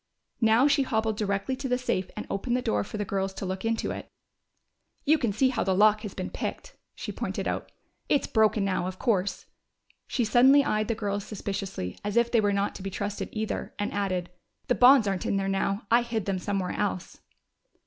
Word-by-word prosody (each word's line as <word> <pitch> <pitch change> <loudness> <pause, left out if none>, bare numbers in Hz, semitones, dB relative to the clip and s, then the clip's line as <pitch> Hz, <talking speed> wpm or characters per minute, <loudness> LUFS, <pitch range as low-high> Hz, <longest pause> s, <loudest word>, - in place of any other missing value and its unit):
Now 225 +4 +5
she 280 -1 +3
hobbled 220 -4 0
directly 200 +4 -1
to 270 0 -4
the 250 - +2
safe 190 -7 -1
and 210 - -4
opened 240 +5 -1
the 250 - -3
door 105 -1 +1
for 210 - -7
the 205 - -2
girls 195 0 -2
to - - -5
look 190 0 -4
into 225 0 -1
it. - - -7 1.0
"You 310 +2 +4
can 235 -5 0
see 260 +6 +2
how 240 -3 -1
the 190 - +1
lock 215 +2 +5
has 210 -3 -7
been 185 - -4
picked," - - -5 0.2
she - - -5
pointed - - -3
out. - - -3 0.4
"It's 285 - +3
broken 215 -2 +2
now, 185 -2 0
of 185 0 -6
course." 200 -5 0 0.6
She 245 - 0
suddenly 260 +6 +6
eyed 215 0 0
the 230 - 0
girls 205 -2 -2
suspiciously, 195 - -5
as 205 +2 -2
if 235 0 +3
they 230 - +4
were 205 -1 +2
not 200 0 0
to - - -11
be 195 - -4
trusted 200 +2 -4
either, 220 0 -4
and 205 - -2
added, 185 -3 -2 0.4
"The - - +5
bonds 250 -2 +6
aren't 195 -2 -1
in 200 - +1
there 195 0 -1
now! 195 +2 -1
I 235 +1 +6
hid 230 -4 -3
them 195 -2 -1
somewhere 195 -1 -2
else." 195 -3 -3
210 Hz, 210 wpm, -27 LUFS, 195-235 Hz, 1.0 s, suddenly